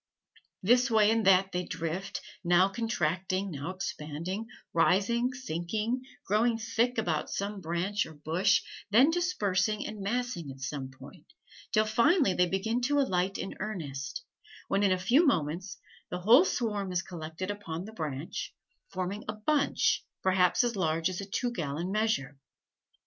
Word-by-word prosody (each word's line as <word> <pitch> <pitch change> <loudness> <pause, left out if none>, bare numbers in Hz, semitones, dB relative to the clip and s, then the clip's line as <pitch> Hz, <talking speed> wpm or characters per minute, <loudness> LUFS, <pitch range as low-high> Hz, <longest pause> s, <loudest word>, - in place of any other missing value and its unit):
This 245 +6 +4
way 220 -2 +5
and 225 -2 +1
that 190 -1 +7
way - - -24
they 180 0 0
drift, 170 +4 -4 0.2
now 175 +2 +4
contracting, 190 -3 -1
now 145 +1 -5
expanding, 185 +2 -4 0.3
rising, 205 +9 +3
sinking, 220 +1 -2 0.2
growing 225 +3 +2
thick 230 +2 0
about 165 -8 0
some 200 0 -3
branch 180 +5 -1
or 160 - -12
bush, 175 +7 +2 0.3
then 250 +9 +6
dispersing 215 - 0
and 210 -2 -6
massing 225 - -2
at 135 0 -9
some 135 0 -4
other 130 - -20
point, - - -13 0.4
till 215 0 +3
finally 240 - +3
they 180 0 +3
begin 220 +7 -1
to 290 +4 +2
alight 190 -7 +1
in 195 - -4
earnest, 145 -10 -5 0.4
when 195 - +1
in 200 -2 +3
a 185 - +3
few 235 - +4
moments 175 - 0 0.3
the 180 - -4
whole 240 - +7
swarm 210 - -1
is 180 -1 0
collected 170 +2 -5
upon 185 -4 -5
the 220 - -10
branch, 155 -4 -5 0.3
forming 185 +3 -3
a 210 - -2
bunch 280 +7 +1 0.2
perhaps 185 +2 +3
as 240 -2 0
large 165 -1 +1
as 185 - -4
a - - -5
two 245 +5 -1
gallon 170 -2 -3
measure. 195 -11 0
195 Hz, 155 wpm, -30 LUFS, 170-225 Hz, 0.4 s, that